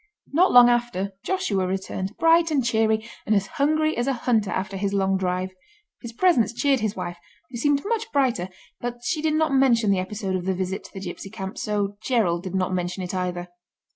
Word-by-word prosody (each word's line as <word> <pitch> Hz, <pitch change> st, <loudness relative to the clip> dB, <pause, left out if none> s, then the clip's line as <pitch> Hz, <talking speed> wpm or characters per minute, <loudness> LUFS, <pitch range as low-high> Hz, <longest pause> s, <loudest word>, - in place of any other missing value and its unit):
Not 360 Hz, +5 st, +4 dB
long 245 Hz, -1 st, +9 dB
after 240 Hz, -5 st, 0 dB
Joshua 200 Hz, -, 0 dB
returned, 190 Hz, +1 st, -4 dB
bright 330 Hz, 0 st, +4 dB
and 280 Hz, -6 st, +1 dB
cheery, 220 Hz, -1 st, +1 dB, 0.2 s
and 215 Hz, -, +3 dB
as 200 Hz, -1 st, +2 dB
hungry 310 Hz, +7 st, +1 dB
as 240 Hz, +2 st, -1 dB
a 275 Hz, -, +2 dB
hunter 230 Hz, -4 st, +1 dB
after 190 Hz, +1 st, -3 dB
his 200 Hz, +1 st, -1 dB
long 195 Hz, -1 st, +2 dB
drive. 185 Hz, 0 st, -1 dB, 0.5 s
His 235 Hz, -, -7 dB
presence 240 Hz, -5 st, +2 dB
cheered 275 Hz, +1 st, +2 dB
his 215 Hz, -2 st, -2 dB
wife, 175 Hz, -2 st, -5 dB, 0.3 s
who 240 Hz, -, -5 dB
seemed 285 Hz, +3 st, +1 dB
much 455 Hz, +1 st, -2 dB
brighter, 245 Hz, -10 st, +1 dB, 0.3 s
but 240 Hz, 0 st, -5 dB
she 310 Hz, +4 st, -1 dB
did 310 Hz, -1 st, +1 dB
not 315 Hz, -2 st, +1 dB
mention 240 Hz, -6 st, +4 dB
the 195 Hz, -, +2 dB
episode 190 Hz, 0 st, -3 dB
of 180 Hz, -1 st, -3 dB
the 190 Hz, 0 st, 0 dB
visit 190 Hz, +1 st, -3 dB
to -, -, -13 dB
the 195 Hz, -, -7 dB
gipsy 190 Hz, +1 st, -7 dB
camp, 195 Hz, -2 st, -6 dB
so 205 Hz, -1 st, -2 dB
Gerald 210 Hz, -9 st, +1 dB
did 185 Hz, 0 st, -6 dB
not 185 Hz, 0 st, 0 dB
mention 180 Hz, +1 st, -2 dB
it 180 Hz, -, -5 dB
either. 180 Hz, -1 st, -3 dB
215 Hz, 205 wpm, -24 LUFS, 190-265 Hz, 0.5 s, long